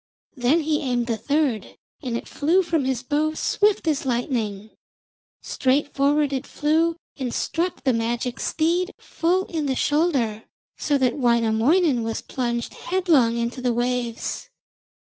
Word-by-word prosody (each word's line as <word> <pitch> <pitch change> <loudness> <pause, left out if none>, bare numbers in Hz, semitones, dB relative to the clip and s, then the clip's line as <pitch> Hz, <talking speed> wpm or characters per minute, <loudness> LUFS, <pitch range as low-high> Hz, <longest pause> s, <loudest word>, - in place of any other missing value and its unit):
Then 265 +6 +2
he 305 0 0
aimed 245 -4 0
the 230 -1 -1
third, 280 -2 -1 0.2
and 245 -5 -2
it - - -8
flew 340 +6 +2
from 325 -5 0
his 260 -2 -1
bow 305 +3 0
swift 410 +1 +1
as 300 -3 +1
lightning. 230 -5 -2 0.7
Straight 275 +2 0
forward 285 +1 +2
it 265 0 -3
flew, 320 +3 +1 0.2
and 260 -4 -3
struck 340 +7 -2
the 260 - +3
magic 235 +2 -2
steed 345 +4 0
full 360 +3 0
in 315 -4 -3
the 265 - 0
shoulder 275 -10 +1 0.3
so 290 -2 +1
that 260 0 +1
Wainamoinen 240 +5 +3
was 225 0 -3
plunged 235 -2 -3
headlong 320 -11 +2
into 235 +2 -2
the 250 -1 +1
waves. 240 -1 -2
265 Hz, 145 wpm, -23 LUFS, 240-315 Hz, 0.7 s, the